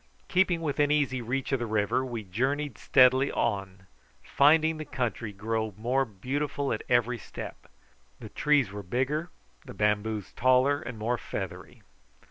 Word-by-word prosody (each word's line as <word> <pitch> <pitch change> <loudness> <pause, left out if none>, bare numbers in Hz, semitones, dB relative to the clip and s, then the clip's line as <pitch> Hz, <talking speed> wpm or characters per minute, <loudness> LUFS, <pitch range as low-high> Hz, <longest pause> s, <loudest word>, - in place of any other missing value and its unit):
Keeping 180 -2 +2
within 145 -2 +1
easy 140 -4 +1
reach 125 +4 -3
of 135 - +1
the 120 - -3
river 105 +3 +1
we 120 -4 -5
journeyed 130 +7 -2
steadily 130 +2 +4
on, 95 -4 -2 0.4
finding 160 +2 +4
the 155 - -5
country 120 -6 -3
grow 110 +1 -3
more 125 +5 +1
beautiful 135 +6 -2
at 110 - -3
every 120 0 +2
step. - - -9 0.5
The - - -9
trees 145 -8 +2
were 105 0 -6
bigger, 135 - -1 0.3
the - - -11
bamboos 105 0 -1
taller 130 +3 +3
and 120 - -7
more 120 +3 -1
feathery. - - -7
125 Hz, 145 wpm, -28 LUFS, 110-145 Hz, 0.5 s, steadily